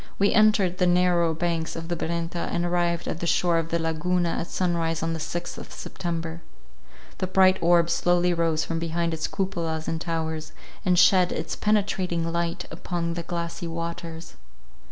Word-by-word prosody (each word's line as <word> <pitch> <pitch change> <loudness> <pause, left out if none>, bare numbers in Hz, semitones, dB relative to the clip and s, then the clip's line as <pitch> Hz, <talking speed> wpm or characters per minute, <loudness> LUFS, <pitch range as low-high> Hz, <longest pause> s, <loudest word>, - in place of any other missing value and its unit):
We 200 0 +3
entered 210 -4 +4
the 180 - +4
narrower 175 -2 +3
banks 165 -1 -1
of 165 0 -5
the 175 - -1
Brenta, 170 +1 -3
and 175 0 0
arrived 175 -1 0
at 160 - -3
the 170 - -2
shore 170 -1 +3
of 165 0 -4
the 170 - +1
Laguna 170 +2 0
at 165 - -2
sunrise 165 -3 -1
on 165 0 -1
the 165 - -4
sixth 175 +2 -4
of - - -10
September. 165 -1 -5 0.8
The 185 - -1
bright 185 0 +4
orb 170 0 +4
slowly 175 +1 +2
rose 165 -2 +1
from 165 0 -2
behind 165 0 -1
its 160 -1 -2
cupolas 165 -5 -2
and 160 0 -2
towers, 160 -2 -3 0.3
and 180 -2 +3
shed 180 0 +5
its - - -3
penetrating 185 -5 0
light 170 0 -1
upon 170 0 -3
the 170 - -3
glassy 170 0 -4
waters. 165 0 -5
170 Hz, 175 wpm, -25 LUFS, 165-180 Hz, 0.8 s, shed